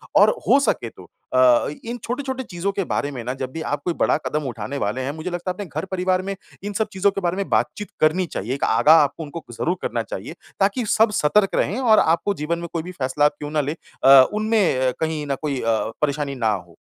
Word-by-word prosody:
और - - +7 0.2
हो 275 - +6
सके 120 - 0
तो 95 - -15 0.3
अ, 130 -2 +5 0.2
इन 235 +1 -5
छोटे-छोटे 260 +1 -3
चीज़ों 185 -2 -3
के 195 0 -2
बारे 145 -3 -2
में 125 -4 -6
ना 125 +2 -3
जब 130 -1 -5
भी 160 - -6
आप 145 -2 -2
कोई 175 - 0
बड़ा - - +3
कदम 150 0 -1
उठाने 120 +3 -5
वाले 105 +2 -2
हैं 130 +2 -2
मुझे 160 +4 -5
लगता 175 +1 -3
है - - -4
अपने 200 +2 -6
घर 155 0 -5
परिवार 185 0 +1
में 195 +1 -4 0.3
इन 205 0 -4
सब 220 +2 0
चीज़ों 195 +1 +2
के 195 - -4
बारे 175 -1 0
में 200 - -3
बातचीत 210 - 0
करनी 160 +4 +3
चाहिए 125 - -4
एक 140 - -5
आगाह 155 +2 +5
आपको 145 +3 -3
उनको 155 +2 -8
ज़रूर 170 +9 -1
करना - - -2
चाहिए, - - -7 0.3
ताकि 205 +5 +1
सब 220 +1 +3
सतर्क 195 +7 +3
रहें 210 - 0
और 230 -4 +5
आपको 170 +5 +2
जीवन 170 0 -2
में 170 - -5
कोई 165 -2 -2
भी 180 - -7
फ़ैसला 145 -2 0
आप 150 - +2
क्यों 150 0 -6
ना 155 -1 +1
ले 145 +1 -2 0.3
अ, 135 0 +9
उनमें 215 - +2
अ, - - -1
कहीं 160 -2 -2
न 140 - 0
कोई 145 -4 -2
अ, 115 -1 0
परेशानी 145 -1 -1
ना 115 -4 +1
हो। 90 -3 -11
160 Hz, 245 wpm, -22 LUFS, 140-195 Hz, 0.3 s, अ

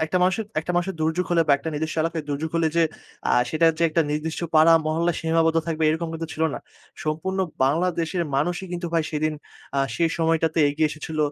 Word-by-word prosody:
একটা 160 +3 -2
মানুষ, 185 +1 +3 0.3
একটা 165 - -5
মানুষের 175 +2 0
দুর্যোগ 160 +3 +1
হলে 170 -1 +4
বা - - +6
একটা 140 - -5
নিজস্ব 155 +2 -3
এলাকায় 165 -1 -2
দুর্যোগ 145 +3 -2
হলে 165 -1 +2
যে, 170 - +5 0.5
আ - - +1 0.2
সেটা 165 +1 +3
যে - - 0
একটা 165 +1 +2
নির্দিষ্ট 155 +2 -2
পাড়া, 160 +1 +7
মহল্লা 165 +2 +1
সীমাবদ্ধ 165 0 +2
থাকবে, 160 -1 -2
এরকম 165 +2 -2
কিন্তু 165 0 -4
ছিল 160 - -2
না। - - -4 0.5
সম্পূর্ণ 160 +5 -2 0.3
বাংলাদেশের 170 +4 0
মানুষই 175 +6 -1
কিন্তু 175 0 -3
ভাই 165 - +3
সেদিন, 155 0 0 0.4
আ - - +2 0.2
সেই 170 -1 +2
সময়টাতে 165 0 +1
এগিয়ে 155 +2 +1
এসেছিল, 155 +1 -6
160 Hz, 195 wpm, -24 LUFS, 155-170 Hz, 0.5 s, পাড়া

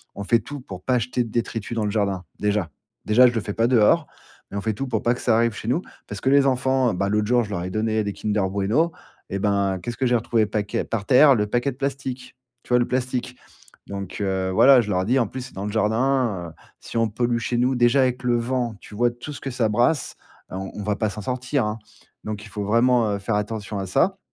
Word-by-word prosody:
on 100 - -5
fait 115 +2 +3
tout 140 +6 -8
pour 95 -6 -9
pas 125 -1 +2
jeter 125 +1 -1
de 115 - -8
détritus 115 0 -3
dans 110 - 0
le 105 - -1
jardin, 100 -4 -1
déjà. 105 -4 0 0.4
Déjà, 120 +4 +6
je 120 - 0
le 115 - -1
fais 100 +2 -5
pas 115 +3 +2
dehors, 125 +6 +4 0.4
mais 100 - -4
on 100 - -2
fait 110 +1 -1
tout 135 +5 -4
pour - - -1
pas 120 - +3
que 125 - -7
ça 110 - +3
arrive 115 -1 +2
chez 105 - -8
nous. 155 +8 +1 0.3
Parce 105 -2 -7
que 130 - +1
les 140 0 +5
enfants, 130 -2 +2
bah, 100 +2 -1
l'autre 105 0 +1
jour 120 +1 +3
je 105 - -8
leur 90 -4 -2
ai 90 - -4
donné 110 +1 0
des 100 - -2
Kinder 105 -1 -1
Bueno. 105 - +1 0.4
Et 100 - -3
ben, 100 -1 +1
qu'est-ce 115 +6 -5
que 135 - 0
j'ai 125 0 +3
retrouvé 115 -1 +1
paquet 105 -1 -2
par 110 -3 -3
terre? 135 +3 +6
Le 105 - +1
paquet 120 +5 0
de - - -12
plastique, 135 -2 -4 0.3
tu - - -21
vois? 125 0 +4
Le 120 - +1
plastique. 125 0 -2 0.5
Donc, 100 -2 -6
heu, 95 -1 -1
voilà, 130 +7 +7
je 105 - -5
leur 90 -2 +1
ai - - -4
dit 125 +6 +2
en 115 - +1
plus, 130 +5 -6
c'est - - -17
dans 95 +1 -4
le 105 - -3
jardin, 110 -3 +1
heu, - - -18 0.3
si - - -11
on 115 -1 +2
pollue 120 +2 0
chez 120 +1 -2
nous 125 +2 +2
déjà 125 +2 +4
avec 125 -1 0
le 120 -1 +2
vent, 120 -1 -1
tu 105 - -12
vois 120 +2 +2
tout 120 +5 -8
ce - - -10
que 135 - -4
ça 120 -2 +1
brasse, 120 +8 +1 0.4
heu, - - -5
on 95 0 -5
on 105 - -5
va 105 0 0
pas 110 -2 0
s'en 105 +1 -7
sortir, 125 +2 -1
hein. 105 +1 -3 0.5
Donc 105 0 -5
il 110 - -12
faut 105 +2 -4
vraiment, 115 +1 +3
heu, - - -5
faire 105 +2 -2
attention 105 0 -3
à 95 - -3
ça. 190 - +2
115 Hz, 265 wpm, -23 LUFS, 105-125 Hz, 0.5 s, voilà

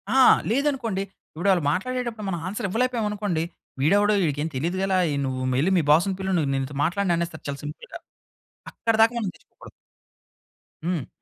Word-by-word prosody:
ఆ! - - +6 0.3
లేదనుకోండి, 245 -6 0 0.3
ఇపుడు 185 +5 0
ఆళ్ళు 180 -4 +2
మాట్లాడేటప్పుడు 235 +2 -3
మనం 175 -3 -2
ఆన్సర్ 210 +3 -3
ఇవ్వలేకపోయామనుకోండి, 210 -6 0 0.4
వీడెవడో 205 +8 +4
ఈడికేమి 150 +1 -1
తెలియదు 170 +8 -1
గల 195 0 0 0.2
ఏ, - - -1
నువ్వు 130 -1 -3 0.2
ఎల్లి 185 - +2
మీ 170 - +2
బాస్‌ని 175 +5 +4
పిలు, 190 0 -2
నేన్నీతో 135 -1 -1
మాట్లాడననేస్తారు. 170 -2 -1
చాలా 140 - -4
సింపుల్‌గా. 150 - -8 0.7
అక్కడి 225 -1 0
దాకా 225 +2 +5
మనం 210 -5 -2
తెచ్చుకోకూడదు. - - -16 1.2
హ్మ్. 170 -7 -1
190 Hz, 145 wpm, -24 LUFS, 160-220 Hz, 1.2 s, ఆ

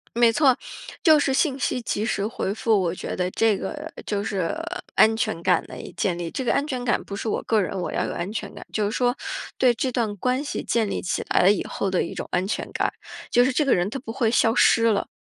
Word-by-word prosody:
没 235 -1 +5
错， 265 +1 +4 0.5
就 315 -4 +6
是 280 -2 +1
信 270 0 +1
息 250 - -1
及 215 -2 -2
时 205 -3 -1
回 200 -3 -3
复， 220 -1 +2
我 175 -3 0
觉 - - -5
得 180 0 -1
这 220 -1 +2
个 - - -6
就 205 -1 -1
是 190 - -2 0.4
安 220 0 +5
全 165 -6 -1
感 - - +2
的 - - -10 0.2
建 180 -2 +1
立。 170 -1 -4
这 260 - -4
个 - - +2
安 280 - +1
全 255 -4 -3
感 235 - +1
不 200 - -7
是 205 - -4
我 - - 0
个 220 - +2
人， 195 -1 -2
我 - - -3
要 - - -1
有 - - -4
安 175 +4 -4
全 220 - -5
感。 - - -9
就 215 - 0
是 205 - -1
说 245 +1 +1 0.4
对 250 -2 +4
这 255 +2 -2
段 225 -4 -1
关 255 +6 0
系 290 - -4
建 225 -3 +1
立 - - -2
起 - - -2
来 - - +3
了 185 - +6
以 205 - 0
后 195 - -2
的 185 - +1
一 - - -6
种 - - -5
安 180 +1 0
全 210 - -3
感， - - 0 0.4
就 245 - +5
是 260 - +2
这 295 +3 +1
个 275 - +4
人 180 +2 +1
他 240 - -4
不 230 -4 -7
会 235 -3 +1
消 225 -1 +3
失 230 -1 +4
了。 220 -3 +2
225 Hz, 280 characters per minute, -24 LUFS, 200-250 Hz, 0.5 s, 就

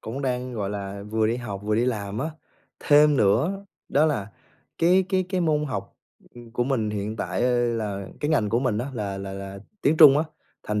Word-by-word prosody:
cũng 130 +6 -6
đang, 125 -1 -2
gọi 100 -3 -3
là, 100 -1 -5
vừa 110 +1 0
đi 115 +2 0
học 105 -5 -6
vừa 105 - 0
đi 115 +3 +2
làm 105 -4 -2
á. 155 +5 -2 0.5
Thêm 150 0 +5
nữa 140 - +2 0.2
đó 150 +3 +3
là 105 -10 -2 0.5
cái 180 +3 +4
cái 190 -1 +1
cái 185 -1 -1
môn 150 -3 +1
học, 100 -8 -5 0.4
ừm, 120 -1 -12
của 120 +1 0
mình 120 -5 0
hiện 105 +1 -4
tại, 115 - -2
ơ, 125 -1 +2
là 105 -4 -3
cái 145 - -1
ngành 120 -10 +2
của 115 +3 +1
mình 125 -5 0
á 120 - -2
là 100 -4 -3
là 95 0 -6
là 100 0 -7 0.2
tiếng 150 +3 +3
Trung 150 -3 +8
á, 155 - +1 0.4
thành 105 0 -2
120 Hz, 215 wpm, -25 LUFS, 105-145 Hz, 0.5 s, Trung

